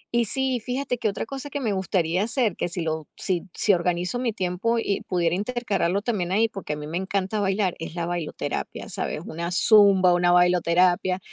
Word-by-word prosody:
y 235 -1 +3
sí, 265 +3 -1
fíjate 250 +1 -3
que 225 - +1
otra 200 - -4
cosa 275 +4 -7
que 285 - -4
me 225 -6 -1
gustaría 185 -2 0
hacer, 230 -4 0
que - - -2
si 175 0 -4
lo 160 -1 -3
si 180 -3 -2
si 205 - +3
organizo 180 +5 0
mi 245 -2 0
tiempo 195 +3 -1
y 205 -3 -1
pudiera 175 -2 +1
intercalarlo 205 -4 -1
también 195 -7 -1
ahí, 220 +4 +3
porque 195 -8 -5
a - - -3
mí 150 0 -7
me 160 +3 -3
encanta 195 +2 -2
bailar, 195 -2 +1
es 165 0 -7
la 170 -1 -2
bailoterapia, 175 -2 -4
¿sabes?, - - -3
una 170 +2 -4
zumba, 195 -2 +5
una 175 0 +3
bailoterapia, 180 +1 +3
190 Hz, 195 wpm, -24 LUFS, 175-225 Hz, -, zumba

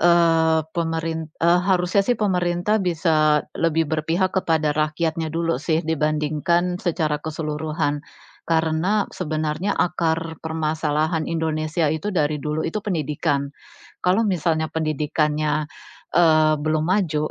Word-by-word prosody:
eee, 165 -2 +4
pemerin 165 -1 -2
e 170 - +3
harusnya 185 +1 +2
sih 245 +4 +1
pemerintah 180 +1 +1
bisa, 155 -4 +2
lebih 165 -1 +1
berpihak 165 +4 0
kepada 160 -5 +1
rakyatnya 155 +2 -1
dulu 165 0 0
sih, 160 +1 +1
dibandingkan 155 +3 0
secara 160 -4 0
keseluruhan. 150 -1 -3 0.5
Karena, 165 +5 +1
sebenarnya 155 +2 -2
akar 165 -2 -1
permasalahan 155 0 -1
Indonesia 160 0 -1
itu, 160 +7 -2
dari 150 -4 0
dulu 150 +1 -2
itu 210 +6 -3
pendidikan. 150 -6 -1 0.6
Kalau 190 +5 +2
misalnya 165 -4 0
pendidikannya, 155 -1 -1 0.5
eee, 155 -2 +5
belum 155 +1 0
maju, 165 -5 0
160 Hz, 110 wpm, -22 LUFS, 155-175 Hz, 0.6 s, eee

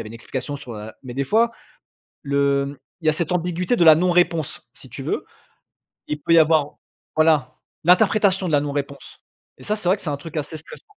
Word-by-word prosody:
avait 110 - -7
une 115 - -11
explication 135 +4 -5
sur 125 -3 -10
la 110 0 -9
mais 125 -1 -7
des 140 0 -1
fois, 230 +6 +3 0.7
le 140 0 +1
mmh, 140 0 -8 0.2
il - - -12
y - - +5
a - - +2
cette 170 +1 -1
ambiguïté 180 +4 0
de 175 - +3
la 160 -2 +9
non-réponse 175 -3 +1
si - - -15
tu - - -8
veux. - - -2 0.8
Il 150 0 -4
peut 165 - +1
y - - +8
avoir 155 -2 +3 0.4
voilà, 155 -5 +2 0.3
l'interprétation 190 0 +3
de 160 - -2
la 145 - +4
non-réponse 140 -1 -5 0.4
et - - -14
ça 210 +1 -1
c'est 195 -4 -3
vrai 190 - +4
que - - -13
c'est - - -5
un 145 - -2
truc 160 +2 -10
assez 150 +2 -5
stressant. 155 - -12
155 Hz, 220 wpm, -22 LUFS, 140-180 Hz, 0.8 s, la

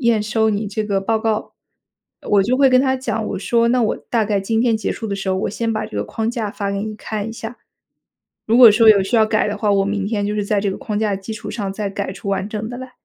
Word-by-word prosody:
验 235 -4 +2
收 220 +1 +1
你 210 0 -2
这 210 +2 -3
个 200 -2 0
报 220 +3 0
告。” 220 -1 -2 0.8
我 200 -1 +5
就 250 +6 +1
会 275 -1 +5
跟 255 0 +5
他 265 -1 +1
讲， 225 -4 -3
我 - - -3
说： 235 +4 +1
“那 250 0 +2
我 215 - 0
大 230 -3 +2
概 205 -1 0
今 225 +3 0
天 235 -2 +2
结 220 - -3
束 225 - -4
的 200 - -3
时 195 -1 -4
候， 190 - +1
我 190 - -2
先 225 +2 -2
把 215 0 -2
这 - - -9
个 100 - 0
框 225 - -2
架 225 -4 -3
发 200 -2 -3
给 200 - -2
你 215 0 -5
看 215 0 -4
一 - - -5
下。 230 +1 -7 0.9
如 225 +2 +3
果 240 -3 +10
说 225 +1 +4
有 200 -3 +7
需 195 - -1
要 220 - +5
改 215 -1 +1
的 205 - -3
话， 210 -2 +1
我 195 -1 +3
明 200 -1 -2
天 205 -2 -1
就 205 - -2
是 205 - -1
在 200 -1 0
这 205 - 0
个 - - -5
框 220 -7 -4
架 215 -1 0
的 - - -5
基 195 +3 -7
础 220 - -7
上， 200 -4 -3
再 205 -1 -3
改 195 -1 -4
出 200 +1 -6
完 195 0 -1
整 215 +1 -5
的 245 - -7
来。” 255 0 -9
215 Hz, 315 characters per minute, -19 LUFS, 200-230 Hz, 0.9 s, 果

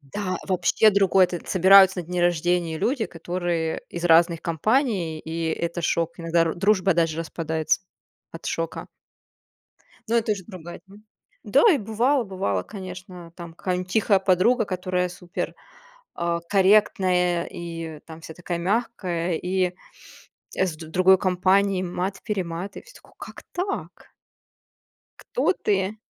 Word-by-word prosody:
Да, 185 +6 -4
вообще 185 +4 +3
другой. 195 -2 +4
Этот, 175 -1 -7
собираются 190 0 +6
на 170 - -10
дне 180 +1 -2
рождения 175 -1 +1
люди, 240 - 0
которые 170 -1 -3
из 170 0 -6
разных 170 0 +4
компаний, 180 - 0
и 165 +1 -4
это 170 +1 -3
шок. 170 +1 -1
Иногда 165 0 0
р 165 -1 -1
дружба 195 0 +2
даже 165 -1 +1
распадается, 160 -1 -1 0.5
от 165 - -9
шока. 165 0 -4 1.2
Ну, 230 - 0
это 230 -1 +1
уже 195 -3 -6
другая 175 -4 -10
тема. 200 +2 -16 0.4
Да, - - +3
и 300 - +2
бывало 235 +5 +1
бывало, 100 - -2
конечно, 180 -3 -10
там 170 -2 -9
какая-нибудь 180 +1 -3
тихая 205 0 +3
подруга, 195 +6 +3
которая 180 -1 -2
супер, 180 0 -6 0.6
а, 170 0 -1
корректная 185 -3 +3
и 165 -2 -7
там 160 0 -11
вся 160 - -9
такая 175 0 -4
мягкая. 180 -3 -1
И, 180 0 -1 0.8
э, 190 - +2
с 165 -4 -5
д 160 0 -10
другой 185 +3 +4
компанией 185 +1 +2
мат-перемат 185 0 -4
и - - -8
всё - - -18
такое: - - -20
как - - -10
так? 385 +3 -5 1.1
Кто - - 0
ты? 200 - -1
180 Hz, 140 wpm, -24 LUFS, 170-195 Hz, 1.2 s, собираются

